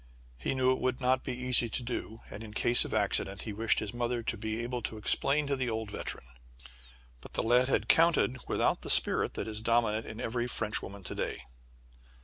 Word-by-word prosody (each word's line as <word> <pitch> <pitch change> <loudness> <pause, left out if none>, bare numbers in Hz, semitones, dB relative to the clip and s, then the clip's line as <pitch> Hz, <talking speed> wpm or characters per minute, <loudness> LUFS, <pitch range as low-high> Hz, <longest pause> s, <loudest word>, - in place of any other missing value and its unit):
He 60 - -2
knew 130 0 +3
it 130 - 0
would 130 0 -1
not 130 0 +1
be 130 - -4
easy 125 -2 +3
to 125 - -1
do, 115 -2 -5
and, 105 - -8
in 105 -1 -11
case 120 +1 +6
of - - -7
accident, 100 -2 0
he 110 - -5
wished 110 +1 +2
his 105 0 -2
mother 120 0 -2
to 115 - -1
be 110 +1 -4
able 120 0 -4
to 110 - -5
explain 140 +7 +3
to 140 0 0
the 130 -2 -2
old 110 -2 -4
veteran. - - -6 1.0
But - - -13
the - - -1
lad 125 +2 +3
had 135 - 0
counted 160 -6 +3
without - - +1
the - - -7
spirit - - +3
that - - -3
is 110 0 -6
dominant 115 -1 +1
in 110 - -8
every 120 +1 -2
French 105 -3 0
woman 100 0 -9
to - - -6
day. - - -4
120 Hz, 215 wpm, -30 LUFS, 110-125 Hz, 1.0 s, case